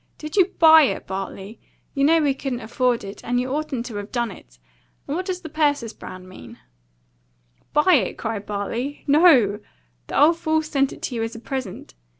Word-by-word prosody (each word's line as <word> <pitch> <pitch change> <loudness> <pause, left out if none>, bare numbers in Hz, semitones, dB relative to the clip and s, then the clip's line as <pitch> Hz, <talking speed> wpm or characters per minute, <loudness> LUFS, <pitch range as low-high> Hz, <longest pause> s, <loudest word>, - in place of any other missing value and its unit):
Did 305 0 -7
you 380 -3 +6
BUY 320 -1 +8
it, - - -11
Bartley? 195 +2 -6 0.3
You 275 - 0
know 325 +3 +5
we 285 -2 +2
couldn't 265 -2 -4
afford 245 0 0
it, 195 +1 -9
and 245 +1 0
you 255 +1 -2
oughtn't 285 -5 -3
to 225 -4 -6
have 205 +1 -7
done 235 -3 -1
it! - - -15 0.5
And 285 - -2
what 370 +3 -3
does 365 -1 -3
the 325 - -8
Persis 290 -7 0
Brand 185 0 -10
mean?" 185 - -12 1.1
"Buy 300 +5 +4
it?" - - -9
cried 220 -3 -4
Bartley. 230 +7 -4
"No! 275 - +5 0.5
The - - -1
old 325 +3 +5
fool's 315 -1 0
sent 275 -3 0
it - - -12
to - - -3
you 230 - -2
as 225 +1 -4
a - - -7
present. 255 -5 -6
255 Hz, 195 wpm, -22 LUFS, 220-305 Hz, 1.1 s, BUY